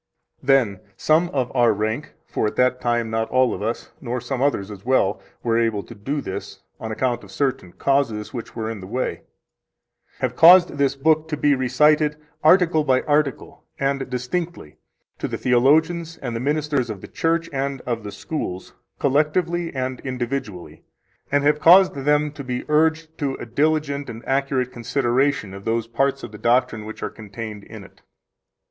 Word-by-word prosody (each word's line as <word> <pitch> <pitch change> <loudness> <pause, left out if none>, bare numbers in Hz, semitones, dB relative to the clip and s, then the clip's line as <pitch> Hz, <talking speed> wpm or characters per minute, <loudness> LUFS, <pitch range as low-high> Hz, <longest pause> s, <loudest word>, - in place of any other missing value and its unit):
14 - - -15
Then 125 -9 +3 0.2
some 160 +3 +3
of 130 -4 -2
our 120 -2 +5
rank 110 +7 -3
(for - - -1
at - - -4
that 125 0 +2
time 120 -2 0
not 110 0 -1
all 130 -1 +3
of - - -6
us, 115 +3 -3
nor 125 0 -3
some 125 +2 -4
others 110 -8 0
as 100 -1 -10
well, 120 -6 +1 0.2
were 115 -1 +2
able 115 -3 0
to - - -11
do 135 +8 -3
this, 95 - -7 0.2
on 110 - -5
account 120 +1 -1
of - - -13
certain 135 -10 -2
causes 135 -6 0
which 120 -3 -7
were 110 -1 -3
in 110 -2 -5
the 95 - -9
way), 125 +6 -3 1.0
have - - -2
caused 175 -3 +7
this 140 -1 +2
book 155 +3 +2
to 155 -2 -3
be 145 0 +3
recited 150 +4 +3 0.3
article 165 -1 +5
by 130 -3 +2
article 145 -2 -1
and 135 -1 -1
distinctly 125 - -4 0.4
to - - -2
the - - -4
theologians, 160 +7 +2
and 120 -3 -5
the - - -2
ministers 145 -2 0
of 100 -4 -6
the - - -9
church 165 +1 0
and 135 0 -2
of 120 -2 -3
the 105 - -6
schools 100 - -5 0.2
collectively 165 +4 +1
and 130 -1 -3
individually, 125 -7 -5 0.5
and 145 0 +2
have 150 +1 +3
caused 185 +4 +7
them 150 +2 +1
to 145 -1 -8
be 125 -1 -3
urged 160 +1 +2
to 140 -3 -1
a - - -7
diligent 145 +3 0
and 115 0 -9
accurate 135 -2 0
consideration 125 -2 0
of 100 0 -9
those 115 +1 0
parts 135 +4 0
of - - -7
the 105 - -11
doctrine 120 -2 +1
which 110 - -8
are - - -3
contained 105 -1 -8
in - - -11
it. - - -18
130 Hz, 180 wpm, -22 LUFS, 115-150 Hz, 1.0 s, caused